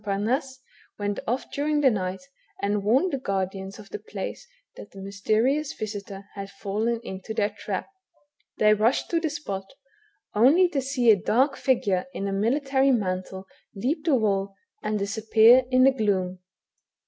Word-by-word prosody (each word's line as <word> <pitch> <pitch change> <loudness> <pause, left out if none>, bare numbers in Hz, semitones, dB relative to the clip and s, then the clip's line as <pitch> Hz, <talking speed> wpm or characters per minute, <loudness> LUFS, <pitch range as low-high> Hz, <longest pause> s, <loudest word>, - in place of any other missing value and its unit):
Pamasse, 235 +7 -1 0.4
went 205 -1 -2
off 245 +4 -2
during 295 +1 0
the 265 -3 +5
night, 185 0 -3 0.4
and 200 0 -1
warned 265 - +2
the 275 - -1
guardians 195 -2 -3
of 210 -2 -13
the - - -5
place 210 - -7 0.3
that - - -11
the 195 - -13
mysterious 215 +9 0
visitor 200 -2 -6
had 195 -1 -7
fallen 210 +4 -2
into* 190 +2 -7
their 210 -2 +1
trap. 205 -2 -5 0.7
They 215 0 +5
rushed 220 +5 +1
to 335 - +2
the 325 -1 -1
spot, 235 -8 -6 0.6
only 280 - +5
to 285 -5 -1
see 255 -3 +3
a 200 -4 +3
dark 270 +5 +2
figure 205 -7 +1
in 200 - -3
a 195 - -2
military 270 +6 +2
mantle 190 -5 -1 0.3
leap 275 +10 -1
the 310 -5 +4
wall, 200 -4 0 0.3
and 215 0 -1
disappear 220 +4 +5
in 255 0 +4
the 270 - +7
gloom. 190 -7 -1
215 Hz, 160 wpm, -25 LUFS, 195-265 Hz, 0.7 s, the